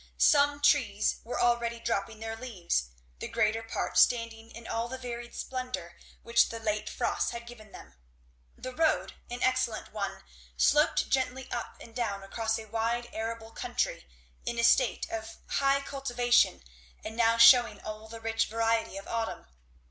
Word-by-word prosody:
Some 290 -1 +4
trees 240 -9 +3
were 240 - -4
already 235 -1 +1
dropping 220 -1 -2
their 225 0 -4
leaves; 185 - -2 0.3
the - - -4
greater 215 +1 +1
part 225 - -1
standing 230 -2 +2
in 230 0 -11
all 230 +1 -2
the 260 +2 -6
varied 240 -2 -7
splendour 255 -9 -5 0.3
which 235 0 +4
the 230 - -5
late 215 -1 -2
frosts - - -1
had 235 0 -6
given 220 -3 -12
them. - - -12 0.6
The 255 - -7
road, 320 -1 +1 0.2
an 245 0 -4
excellent 255 -5 0
one, 200 -3 -4 0.3
sloped 65 +1 +3
gently 260 0 -1
up 235 - -4
and 230 - -12
down 200 -5 -2
across 225 +3 -1
a 225 - -7
wide 230 +2 -2
arable 225 0 -5
country, 65 - -2 0.4
in 235 - -3
a 235 - +1
state 240 +1 +3
of 225 0 -5
high 275 0 +2
cultivation 245 - +2 0.4
and 220 - -5
now 230 0 +3
shewing 240 +1 +7
all 215 0 -7
the 225 +1 -9
rich 225 0 0
variety 225 -1 0
of 195 - -8
autumn. 230 - -3
230 Hz, 160 wpm, -29 LUFS, 220-245 Hz, 0.6 s, shewing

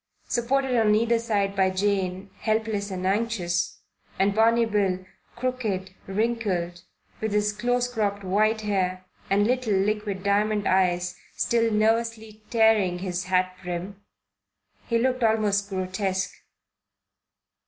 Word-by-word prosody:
Supported 255 +2 +1
on 210 -1 +4
either 230 +1 +2
side 205 -4 0
by 190 -1 +3
Jane, 190 0 -1
helpless 215 -2 -1
and 185 -1 -4
anxious, 190 -4 -1 0.3
and 195 +1 +2
Barney 230 +2 +4
Bill, 195 -4 0 0.3
crooked, 225 -7 -2
wrinkled, 195 -5 -1 0.4
with 220 -1 -2
his 210 0 +1
close 245 +3 0
cropped 205 -4 -2
white 215 +4 +2
hair 185 -3 -1 0.2
and 200 +1 +3
little 250 -3 +1
liquid 200 -1 -1
diamond 205 +1 +1
eyes, 180 -1 +2 0.2
still 230 -1 +1
nervously 220 0 0
tearing 220 -6 +3
his 180 -1 -3
hat 185 0 +1
brim, 180 +3 -5 0.9
he 230 - +2
looked 255 +1 +1
almost 210 -2 +2
grotesque. 190 0 -2
205 Hz, 120 wpm, -25 LUFS, 190-225 Hz, 0.9 s, on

